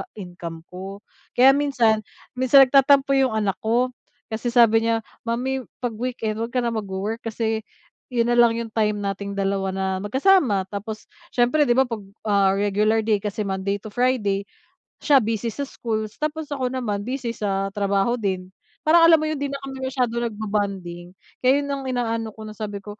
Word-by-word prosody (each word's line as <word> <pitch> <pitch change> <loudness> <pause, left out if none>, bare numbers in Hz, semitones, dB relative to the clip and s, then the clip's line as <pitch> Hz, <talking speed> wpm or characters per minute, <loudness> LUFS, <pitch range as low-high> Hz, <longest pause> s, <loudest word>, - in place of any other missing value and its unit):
income 175 -4 -8
ko. 195 +3 -8 0.3
Kaya 260 +2 +7
minsan, 260 -6 +2 0.4
minsan 270 +1 +7
nagtatampo 275 +1 +4
yung 255 -5 +2
anak 205 -3 -1
ko. 240 +3 +1 0.4
Kasi 220 +2 -3
sabi 230 -2 +4
niya, 225 -1 +1 0.2
"Mommy 260 +3 -1 0.2
'pag 245 - 0
weekend 225 -3 -3
'wag 230 +2 -4
ka 250 - +2
na 235 - 0
magwo-work 210 +1 -3
kasi 225 -1 -2 0.5
yun 235 0 +2
nalang 240 -1 +5
yung 230 0 -4
time 210 -1 +1
nating 200 0 -4
dalawa 195 0 0
na 190 0 -1
magkasama." 255 - +3
Tapos 215 +2 -6 0.3
siyempre 250 +4 +3
'di 240 - +3
ba 265 - +5
'pag, 230 -4 -5 0.3
ah, 200 -2 +3
regular 210 +2 +1
day, 215 -1 +2
kasi 210 +1 -3
Monday 195 0 -2
to 215 - -8
Friday 205 -5 0 0.5
siya 275 -6 +4
busy 225 +1 -2
sa 280 +5 -3
schools 220 -5 -4
tapos 305 0 -3
ako 260 -3 -1
naman 230 -5 -3
busy 250 -3 -3
sa 195 -3 -2
trabaho 200 +4 0
din. 185 -3 -3 0.3
Parang 330 +2 +6
alam 330 - +8
mo 310 - -1
yun, - - -1
'di 285 - -1
na 275 - -4
kami 270 -1 -7
masyadong 245 -3 -1
nagbo-bonding. 195 -5 -4 0.3
Kaya 265 +3 +5
yun - - -5
ang 275 -1 -3
inaano 230 -3 -2
ko 220 - -9
na 215 - -7
sabi 210 -1 -5
ko, 210 0 -10
225 Hz, 175 wpm, -23 LUFS, 200-255 Hz, 0.5 s, alam